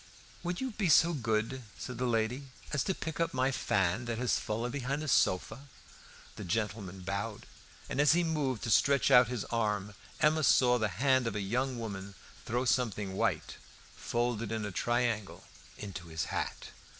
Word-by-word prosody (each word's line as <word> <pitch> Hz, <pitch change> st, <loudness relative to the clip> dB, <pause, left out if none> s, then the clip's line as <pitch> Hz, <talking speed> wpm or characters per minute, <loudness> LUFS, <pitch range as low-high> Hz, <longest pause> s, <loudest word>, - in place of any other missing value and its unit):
"Would 175 Hz, 0 st, -3 dB
you 260 Hz, -1 st, -2 dB
be 200 Hz, -5 st, -1 dB
so 165 Hz, +3 st, +6 dB
good," 115 Hz, -1 st, -1 dB, 0.2 s
said 125 Hz, -2 st, -6 dB
the 125 Hz, -, 0 dB
lady, 120 Hz, +4 st, 0 dB, 0.3 s
"as 145 Hz, -, +1 dB
to 190 Hz, -, 0 dB
pick 160 Hz, -1 st, -5 dB
up 165 Hz, -4 st, 0 dB
my 130 Hz, +1 st, +2 dB
fan 100 Hz, -2 st, 0 dB
that 115 Hz, -1 st, -3 dB
has 125 Hz, +1 st, +1 dB
fallen 115 Hz, +3 st, -2 dB
behind 140 Hz, +3 st, -2 dB
the -, -, -4 dB
sofa?" 125 Hz, +2 st, +1 dB, 0.7 s
The -, -, -6 dB
gentleman 100 Hz, -1 st, -3 dB
bowed, 100 Hz, +4 st, -4 dB, 0.4 s
and 140 Hz, -, 0 dB
as 145 Hz, +1 st, +6 dB
he 175 Hz, +1 st, +3 dB
moved 145 Hz, -8 st, -1 dB
to 115 Hz, -, -1 dB
stretch 140 Hz, +2 st, +4 dB
out 125 Hz, -1 st, +8 dB
his 120 Hz, -3 st, -3 dB
arm, 105 Hz, -3 st, -1 dB, 0.3 s
Emma 155 Hz, +1 st, +3 dB
saw 125 Hz, -3 st, +5 dB
the 110 Hz, -, +1 dB
hand 130 Hz, -2 st, +3 dB
of 110 Hz, -, -3 dB
a -, -, -1 dB
young 125 Hz, +6 st, -1 dB
woman 100 Hz, -3 st, -6 dB, 0.3 s
throw 120 Hz, +3 st, 0 dB
something 105 Hz, -6 st, 0 dB
white, -, -, -1 dB, 0.4 s
folded 120 Hz, -2 st, -1 dB
in 110 Hz, -2 st, -2 dB
a 105 Hz, -, -4 dB
triangle, 120 Hz, -1 st, -1 dB, 0.3 s
into 95 Hz, -4 st, -7 dB
his 80 Hz, -1 st, -3 dB
hat. -, -, -3 dB
120 Hz, 175 wpm, -31 LUFS, 105-135 Hz, 0.7 s, out